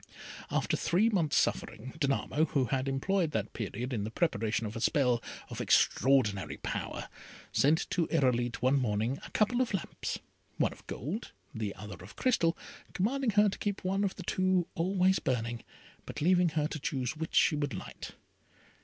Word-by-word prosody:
After - - +1
three 195 +7 +2
months' 170 -9 +1
suffering, 125 +5 -1
Danamo, 145 +1 +1
who 135 -3 +1
had 130 +2 -1
employed 165 +6 +1
that 105 -4 -2
period 120 +4 -4
in 105 -4 -1
the 105 - -3
preparation 115 - 0
of 105 - -5
a 115 - -4
spell 125 -3 +3 0.3
of - - -4
extraordinary 115 -8 +3
power, - - -4 0.4
sent 155 +4 +3
to 170 -3 +1
Irolite 120 -3 +1
one 135 +2 +4
morning 115 +2 0
a - - -8
couple 240 +4 +2
of 240 -5 0
lamps, 190 - -4 0.4
one - - +2
of - - -19
gold, 160 - -5 0.2
the 105 -3 -3
other 100 -4 -9
of 95 - -12
crystal, 175 -10 +2 0.4
commanding 250 +7 +1
her 210 0 +5
to 195 - -3
keep 205 -2 -2
one 195 +2 +1
of 195 - -1
the 185 - -8
two 185 0 +2
always 185 +1 +2
burning, 120 -2 -2 0.4
but - - -6
leaving 180 +2 +4
her 155 -1 0
to 155 - -4
choose 130 -1 -2
which 160 +1 -5
she 155 - +5
would 145 -6 -2
light. - - -8
145 Hz, 170 wpm, -31 LUFS, 120-185 Hz, 0.4 s, her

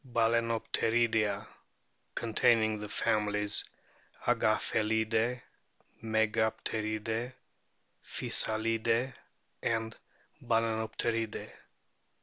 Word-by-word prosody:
Balaenopteroidea, 115 -2 +1 0.7
containing 110 -1 +2
the 105 0 -6
families 105 -1 +1 0.6
Agaphe 115 - +2
lidae, 110 +3 0 0.6
Megapteridae, 110 +1 -1 0.7
Physalidae, 115 +3 0 0.5
and 115 -1 -1 0.5
Baleenopteridae. 115 0 -1
110 Hz, 50 wpm, -31 LUFS, 110-115 Hz, 0.7 s, containing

